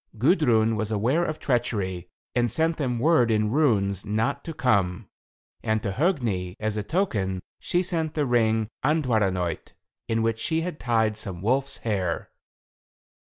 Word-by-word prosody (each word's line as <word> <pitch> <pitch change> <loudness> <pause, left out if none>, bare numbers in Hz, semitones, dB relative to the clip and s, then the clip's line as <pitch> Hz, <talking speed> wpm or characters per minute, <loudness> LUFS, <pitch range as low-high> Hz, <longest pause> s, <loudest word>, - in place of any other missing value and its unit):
Gudrun 120 - +3
was 110 0 -2
aware 120 +11 +1
of 155 -2 -2
treachery, 95 - -1 0.2
and 120 -1 +2
sent 160 +7 +1
them 125 -5 -1
word 125 -2 +3
in 105 -1 +1
runes 100 - +2
not 110 +6 -1
to 165 - -4
come; 105 - +1 0.5
and 110 -1 0
to 100 - -1
Hogni, 115 - 0
as 110 0 -2
a 105 - -1
token, 105 - -1 0.2
she 175 +1 0
sent 165 -4 -2
the 150 -2 +1
ring 110 -3 +2 0.2
Andvaranaut, 110 - 0 0.3
in 115 0 0
which 115 0 0
she 160 +6 0
had 170 -2 -4
tied 110 -3 +1
some 95 -4 -5
wolf's 135 +5 +1
hair. 95 -6 -1
115 Hz, 150 wpm, -25 LUFS, 105-145 Hz, 0.5 s, Gudrun